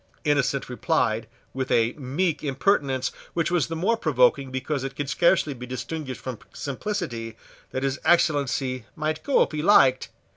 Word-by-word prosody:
Innocent 140 -3 +1
replied, 125 -4 0 0.3
with 130 -1 -3
a 115 0 +3
meek 150 +5 -1
impertinence 135 -2 +1 0.2
which 170 -1 0
was 175 -4 +2
the 165 - -4
more 190 +8 +2
provoking 135 - +2
because 130 +2 -3
it 135 0 -5
could 145 -1 -3
scarcely 170 -4 +3
be 125 -1 -9
distinguished 130 +1 -5
from 130 -4 -6
simplicity, 135 - -4 0.3
that 130 - -3
his 135 -1 -1
Excellency 135 -6 +2
might 155 0 -2
go 280 - +3
if - - -5
he 155 -1 -2
liked. 135 -8 +5
140 Hz, 155 wpm, -25 LUFS, 130-160 Hz, 0.3 s, liked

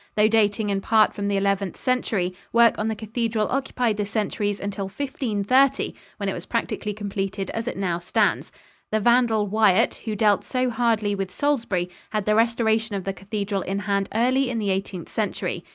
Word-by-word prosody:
Though 210 0 +5
dating 210 -1 +2
in 195 -1 0
part 220 +1 +4
from 200 0 -3
the 200 -1 +1
Eleventh 200 -1 0
Century, 220 -8 0 0.2
work 235 0 +5
on 215 - 0
the 220 - -1
cathedral 220 0 -1
occupied 250 -4 0
the 210 - -1
centuries 205 -1 -1
until 200 0 -4
1530, 255 +3 +1 0.2
when - - -3
it - - 0
was - - -7
practically 210 - -2
completed 195 -2 -3
as 225 +1 -4
it - - -3
now 180 -3 -1
stands. 175 - 0 0.4
The 215 - +2
vandal 235 -1 +3
Wyatt, 215 0 +3
who 220 -2 -2
dealt 205 -1 +3
so 255 -1 -1
hardly 225 -3 +1
with 195 -2 -3
Salisbury, 225 -9 0 0.2
had 215 -2 -2
the 215 - +3
restoration 225 -1 +2
of 195 - -3
the 195 - -2
cathedral 200 0 -3
in 195 +2 -3
hand 200 -1 -1
early 255 +3 +2
in 245 - -2
the 205 -3 0
Eighteenth 190 -2 -4
Century. - - -2
210 Hz, 185 wpm, -24 LUFS, 200-230 Hz, 0.4 s, Though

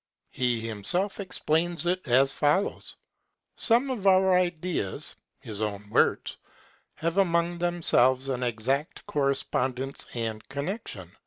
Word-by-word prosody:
He 125 -2 0
himself 175 - +3
explains 175 -3 -1
it 180 -2 -1
as 130 +3 +4
follows: 150 +7 0 0.6
Some 245 +4 +2
of 210 -6 -2
our 190 -1 +5
ideas 175 - -1 0.3
[his 110 -1 -7
own 105 -1 -3
words] - - +1 0.6
have 165 +4 -1
among 170 -2 +1
themselves 135 -7 +2
an 130 -2 -2
exact 125 +5 -2
correspondence 135 -2 -2
and 110 -2 -3
connection. 175 +11 -5
150 Hz, 110 wpm, -27 LUFS, 125-180 Hz, 0.6 s, our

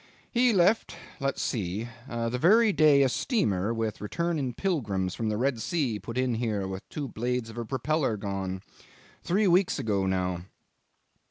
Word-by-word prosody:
"He 245 0 +4
left 200 +2 +3 0.2
let's 135 -1 -1
see 105 0 -2 0.2
the 120 +1 -2
very 215 - +5
day 150 -4 +5
a - - +4
steamer 110 - 0
with 115 -2 -2
returning 155 +3 -1
pilgrims 105 - -1
from 110 -2 -2
the 105 - -1
Red 125 -1 0
Sea 140 - -1
put 115 +5 -7
in 130 -1 +1
here 110 -4 -1
with 95 0 -7
two 145 -2 -4
blades 120 +1 -2
of - - -12
her 120 -1 -4
propeller 135 -1 0
gone. 95 -2 -4 0.6
Three 200 +5 +1
weeks 185 0 +3
ago 100 -3 0
now." 90 -2 -1
120 Hz, 160 wpm, -28 LUFS, 105-155 Hz, 0.6 s, very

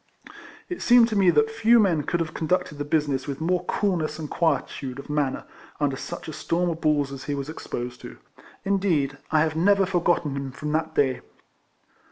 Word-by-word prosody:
It 360 - -6
seemed 240 -1 +6
to 215 - -2
me 195 -3 +5
that 225 +5 +3
few 225 +1 +4
men 180 -8 +3
could 170 +4 -1
have 155 -2 -3
conducted 165 -2 -1
the - - -1
business 145 -3 0
with 140 -1 -4
more 175 +3 0
coolness 170 -7 -1
and 155 -2 -5
quietude 140 -5 -1
of 140 +2 -8
manner, 145 -3 -1 0.3
under 145 -2 +1
such 135 - -7
a - - -4
storn^ 170 +3 -1
of 165 0 -6
balls 145 -3 +1
as 135 -1 -8
he 145 - -2
was 140 +1 -5
exposed 125 -5 -6
to. - - -10 0.5
Indeed, 170 -9 +1
I 155 -1 +3
have 155 0 0
never 195 +4 +4
forgotten 175 -5 +1
him 135 -1 -5
from 150 +2 -4
that 160 +1 -1
day. 130 -3 +2
155 Hz, 195 wpm, -25 LUFS, 145-180 Hz, 0.5 s, seemed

